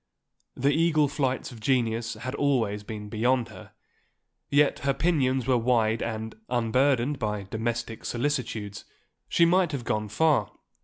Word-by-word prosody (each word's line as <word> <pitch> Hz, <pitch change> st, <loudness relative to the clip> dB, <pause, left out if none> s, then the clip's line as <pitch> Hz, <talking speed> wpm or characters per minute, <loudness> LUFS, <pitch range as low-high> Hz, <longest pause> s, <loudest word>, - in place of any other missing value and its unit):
The 140 Hz, +3 st, +2 dB
eagle 155 Hz, -2 st, +3 dB
flights 135 Hz, -2 st, -2 dB
of 120 Hz, -, -11 dB
genius 115 Hz, -1 st, 0 dB
had 125 Hz, +4 st, -6 dB
always 120 Hz, -8 st, 0 dB
been 105 Hz, 0 st, -7 dB
beyond 120 Hz, +3 st, +1 dB
her, 110 Hz, -, -12 dB, 0.8 s
yet 145 Hz, 0 st, +3 dB
her 140 Hz, -1 st, 0 dB
pinions 135 Hz, -6 st, +1 dB
were 125 Hz, -2 st, +3 dB
wide 115 Hz, -2 st, +2 dB
and, 110 Hz, -1 st, -4 dB, 0.2 s
unburdened 125 Hz, +3 st, +1 dB
by 105 Hz, -3 st, -2 dB
domestic 115 Hz, +3 st, -4 dB
solicitudes, 120 Hz, -6 st, -3 dB, 0.5 s
she 170 Hz, -, +4 dB
might 175 Hz, -1 st, +3 dB
have 135 Hz, -4 st, -3 dB
gone 105 Hz, -3 st, -1 dB
far. 140 Hz, -3 st, +2 dB
120 Hz, 140 wpm, -27 LUFS, 110-140 Hz, 0.8 s, she